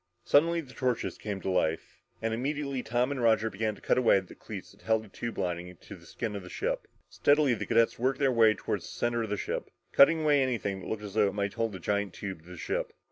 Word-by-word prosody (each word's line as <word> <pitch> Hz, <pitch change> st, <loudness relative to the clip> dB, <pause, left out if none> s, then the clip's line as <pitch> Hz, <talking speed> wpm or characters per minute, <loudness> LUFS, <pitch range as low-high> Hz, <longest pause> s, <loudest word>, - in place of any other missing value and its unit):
Suddenly 165 Hz, +3 st, +4 dB
the 130 Hz, -4 st, -14 dB
torches 125 Hz, -2 st, -1 dB
came 100 Hz, -3 st, -4 dB
to 95 Hz, -, -1 dB
life. 80 Hz, -3 st, -1 dB, 0.2 s
And 115 Hz, 0 st, 0 dB
immediately 140 Hz, +2 st, -2 dB
Tom 120 Hz, +3 st, 0 dB
and 135 Hz, -3 st, -2 dB
Roger 110 Hz, -1 st, +3 dB
began 105 Hz, +2 st, -1 dB
to -, -, -17 dB
cut -, -, +2 dB
away 120 Hz, -5 st, +5 dB
at 95 Hz, -2 st, -4 dB
the -, -, -10 dB
cleats -, -, -9 dB
that -, -, -21 dB
held 110 Hz, -1 st, +1 dB
the 110 Hz, -, -14 dB
tube 115 Hz, +3 st, -5 dB
lining 90 Hz, 0 st, -3 dB
to -, -, -11 dB
the -, -, -16 dB
skin 110 Hz, -3 st, -4 dB
of 100 Hz, -, -4 dB
the 90 Hz, -, -11 dB
ship. -, -, -2 dB, 0.2 s
Steadily, 145 Hz, -2 st, +3 dB
the 105 Hz, -2 st, -4 dB
cadets 115 Hz, 0 st, +3 dB
worked 130 Hz, +2 st, +1 dB
their 135 Hz, -2 st, +3 dB
way 115 Hz, -2 st, +6 dB
up 110 Hz, -, 0 dB
toward -, -, -2 dB
the -, -, -10 dB
center 120 Hz, 0 st, -1 dB
of 110 Hz, -, -3 dB
the 105 Hz, -, -1 dB
ship, -, -, -3 dB, 0.2 s
cutting 155 Hz, +2 st, +6 dB
anything 125 Hz, -9 st, +2 dB
that -, -, -9 dB
looked 110 Hz, -1 st, -3 dB
as 100 Hz, -2 st, -7 dB
though 105 Hz, -2 st, +4 dB
it 100 Hz, -, -3 dB
might 100 Hz, -1 st, -1 dB
hold 115 Hz, -1 st, -1 dB
the 95 Hz, -, -6 dB
giant 100 Hz, +1 st, -1 dB
tube 95 Hz, -5 st, -6 dB
to 85 Hz, -, -17 dB
the 90 Hz, -, -9 dB
ship. -, -, -3 dB
110 Hz, 260 wpm, -29 LUFS, 100-130 Hz, 0.2 s, way